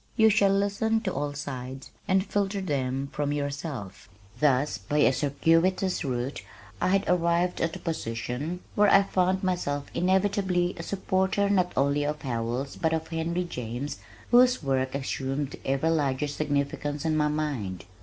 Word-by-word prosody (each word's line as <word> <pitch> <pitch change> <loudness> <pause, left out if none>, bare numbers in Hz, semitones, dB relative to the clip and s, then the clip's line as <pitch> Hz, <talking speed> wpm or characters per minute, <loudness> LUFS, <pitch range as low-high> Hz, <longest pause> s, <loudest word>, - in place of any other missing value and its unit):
You 220 -1 +6
shall 200 -1 +4
listen 200 +3 +1
to 190 -5 -2
all 145 0 -2
sides, 130 -2 -6 0.2
And 190 0 +3
filter 200 -1 -1
them 135 -6 -2
from 145 -1 -1
yourself. 140 - -4 0.3
Thus 140 -6 +2
by 120 +10 -2
a 145 - +5
circuitous 165 +8 +2
route 130 -1 -3 0.4
I - - +2
had 195 +1 +3
arrived 175 0 +1
at 165 -1 0
a - - -7
position 130 +3 -3
where 205 0 +4
I 195 0 +7
found 185 0 +1
myself 145 -6 -1
inevitably 185 -1 +1
a - - -2
supporter 190 +2 0
not 180 -3 +2
only 140 +1 +2
of 150 +1 -2
Howells 120 +2 -3
but 160 -1 +1
of 160 0 -2
Henry 170 +2 -1
James 125 -3 -5 0.3
whose 250 -3 +5
work 130 -1 0
assumed 135 0 -2
ever 135 +4 +1
larger 145 -2 +1
significance 145 0 -2
in 160 -1 +2
my 150 -1 +2
mind. 140 - -3
150 Hz, 155 wpm, -27 LUFS, 135-185 Hz, 0.4 s, I